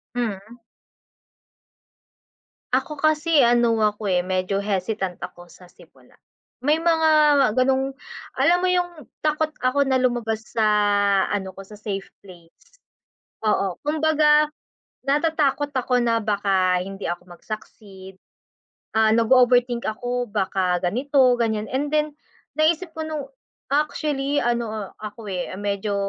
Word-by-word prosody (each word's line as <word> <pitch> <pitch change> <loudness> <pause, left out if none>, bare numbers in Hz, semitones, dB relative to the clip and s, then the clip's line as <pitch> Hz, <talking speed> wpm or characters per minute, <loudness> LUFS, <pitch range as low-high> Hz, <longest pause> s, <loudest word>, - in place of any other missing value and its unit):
Hmm. 225 -1 -4 2.1
Ako 300 -2 -1
kasi 310 0 +3
ano 235 -2 +3
ako, 210 -2 0
eh, 180 - +3
medyo 185 +2 -1
hesitant 195 -2 -2
ako 175 0 -10
sa 180 +1 -17
simula. - - -21 0.5
May 295 +4 +2
mga 325 -1 +2 0.5
ganong 265 +1 +1 0.4
alam 345 - +4
mo 370 - +1
yung 350 -6 -1 0.2
takot 305 0 +1
ako 270 +2 +2
na 260 - +2
lumabas 235 -3 0
sa 225 -2 +2 0.7
ano 190 -2 -3
ko, 195 - -9
sa 210 +1 -14
safe 195 -2 -4 0.2
place. 175 -4 -17 0.9
Oo, 195 -4 0
kumbaga 305 0 +3 0.6
natatakot 290 0 +1
ako 250 -1 +1
na 230 -1 +2
baka 195 -3 +1
hindi 195 +1 -7
ako 175 0 -6
mag-succeed, 195 -3 -10 0.8
ah, 220 0 +4
nag-o-overthink 245 0 +3
ako 245 +3 -3
baka 190 -3 0
ganito, 255 +6 +3
ganiyan 220 -2 0
and 280 +3 -1
then 300 0 +1 0.5
naisip 325 +2 +1
ko 320 - -5
nung 305 -2 -4 0.5
actually 290 -1 0
ano, 225 -4 -2
ako, 215 +1 -8
eh, 180 -1 -3
medyo 205 +1 -2
235 Hz, 120 wpm, -23 LUFS, 200-290 Hz, 2.1 s, alam